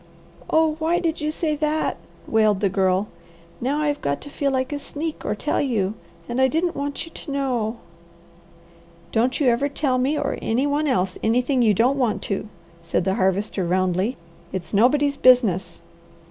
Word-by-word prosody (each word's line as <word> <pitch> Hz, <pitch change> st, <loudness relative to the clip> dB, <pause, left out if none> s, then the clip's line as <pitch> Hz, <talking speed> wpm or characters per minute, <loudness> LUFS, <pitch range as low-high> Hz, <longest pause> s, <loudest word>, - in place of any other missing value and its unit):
"Oh 315 Hz, -1 st, +3 dB
why 325 Hz, +2 st, +1 dB
did 330 Hz, -3 st, -1 dB
you 300 Hz, -, 0 dB
say 310 Hz, 0 st, -1 dB
that?" 305 Hz, +1 st, 0 dB, 0.3 s
wailed 215 Hz, -3 st, +3 dB
the 200 Hz, -1 st, +2 dB
Girl. 190 Hz, +1 st, +1 dB, 0.5 s
"Now 280 Hz, +5 st, 0 dB
I've 290 Hz, -1 st, -1 dB
got 140 Hz, 0 st, -1 dB
to 285 Hz, -, -10 dB
feel 280 Hz, 0 st, 0 dB
like 260 Hz, +1 st, -1 dB
a 290 Hz, -, -3 dB
sneak 305 Hz, +2 st, -5 dB
or 210 Hz, -, -1 dB
tell 290 Hz, -, -1 dB
you 215 Hz, -8 st, 0 dB, 0.3 s
and 240 Hz, +2 st, -1 dB
I 265 Hz, -, +6 dB
didn't 330 Hz, +5 st, 0 dB
want 285 Hz, +2 st, -3 dB
you 330 Hz, -, -13 dB
to 305 Hz, -, -8 dB
know." 245 Hz, -5 st, -1 dB, 1.3 s
"Don't 245 Hz, +3 st, +1 dB
you 290 Hz, -, +1 dB
ever 245 Hz, +5 st, +1 dB
tell 270 Hz, -3 st, 0 dB
me 275 Hz, +4 st, +1 dB
or 285 Hz, -1 st, -2 dB
any 245 Hz, +5 st, +1 dB
one 290 Hz, +1 st, 0 dB
else 190 Hz, -8 st, 0 dB
anything 250 Hz, +4 st, +2 dB
you 215 Hz, -3 st, +4 dB
don't 255 Hz, +7 st, +2 dB
want 235 Hz, -5 st, 0 dB
to," 200 Hz, +1 st, -3 dB, 0.3 s
said 165 Hz, +1 st, -1 dB
the 190 Hz, +1 st, +1 dB
Harvester 190 Hz, +1 st, 0 dB
roundly. 185 Hz, +6 st, 0 dB, 0.3 s
"It's 185 Hz, 0 st, -6 dB
nobody's 280 Hz, +7 st, +3 dB
business!" 195 Hz, -10 st, +3 dB
255 Hz, 175 wpm, -23 LUFS, 205-290 Hz, 1.3 s, I